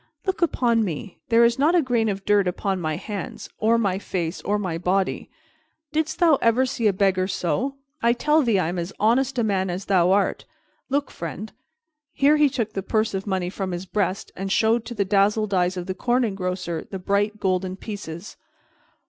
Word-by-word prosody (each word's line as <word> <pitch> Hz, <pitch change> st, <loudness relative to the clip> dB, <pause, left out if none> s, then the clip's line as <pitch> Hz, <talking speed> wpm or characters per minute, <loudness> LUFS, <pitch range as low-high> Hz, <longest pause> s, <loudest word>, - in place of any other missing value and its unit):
Look 380 Hz, -2 st, -2 dB
upon 240 Hz, -8 st, +2 dB
me. 180 Hz, 0 st, -5 dB
There 230 Hz, 0 st, +5 dB
is 235 Hz, +2 st, +1 dB
not 310 Hz, +5 st, +4 dB
a 350 Hz, -, +5 dB
grain 235 Hz, -4 st, +1 dB
of 195 Hz, -1 st, -4 dB
dirt 205 Hz, -2 st, +3 dB
upon 190 Hz, +1 st, -1 dB
my 155 Hz, -2 st, -1 dB
hands 200 Hz, +2 st, -6 dB
or 225 Hz, +2 st, +3 dB
my 195 Hz, -4 st, 0 dB
face 175 Hz, -3 st, -3 dB
or 205 Hz, +1 st, 0 dB
my 180 Hz, -5 st, -3 dB
body. 185 Hz, +2 st, 0 dB, 0.6 s
Didst 315 Hz, +1 st, -1 dB
thou 325 Hz, -5 st, +4 dB
ever 230 Hz, +3 st, +3 dB
see 235 Hz, -3 st, 0 dB
a -, -, +5 dB
beggar 185 Hz, -1 st, +1 dB
so? 250 Hz, +9 st, -1 dB, 0.3 s
I 235 Hz, +1 st, +4 dB
tell 300 Hz, +6 st, +3 dB
thee 230 Hz, -7 st, +2 dB
I 180 Hz, -4 st, +1 dB
am 175 Hz, +1 st, -2 dB
as 170 Hz, +3 st, -4 dB
honest 250 Hz, +5 st, +2 dB
a 235 Hz, -, +2 dB
man 190 Hz, -3 st, 0 dB
as 180 Hz, +2 st, -4 dB
thou 185 Hz, -2 st, +3 dB
art. 200 Hz, +1 st, +1 dB, 0.4 s
Look, 280 Hz, +1 st, 0 dB
friend." 175 Hz, +6 st, -6 dB, 0.6 s
Here 290 Hz, +2 st, +4 dB
he 300 Hz, -1 st, +5 dB
took 230 Hz, -5 st, -3 dB
the 195 Hz, -, -2 dB
purse 215 Hz, +3 st, 0 dB
of 195 Hz, +1 st, -3 dB
money 185 Hz, -2 st, -1 dB
from 190 Hz, -2 st, -4 dB
his 175 Hz, +2 st, -4 dB
breast 190 Hz, -1 st, -2 dB
and 195 Hz, +1 st, -4 dB
showed 225 Hz, +3 st, +2 dB
to 240 Hz, +1 st, -6 dB
the 200 Hz, -2 st, 0 dB
dazzled 205 Hz, +2 st, +2 dB
eyes 180 Hz, 0 st, +1 dB
of 180 Hz, -, -4 dB
the 185 Hz, -, -3 dB
Corn 245 Hz, +6 st, +1 dB
Engrosser 185 Hz, -5 st, -3 dB
the 195 Hz, -, -4 dB
bright 205 Hz, +3 st, 0 dB
golden 185 Hz, -1 st, 0 dB
pieces. 195 Hz, -3 st, -8 dB
200 Hz, 200 wpm, -24 LUFS, 185-235 Hz, 0.6 s, There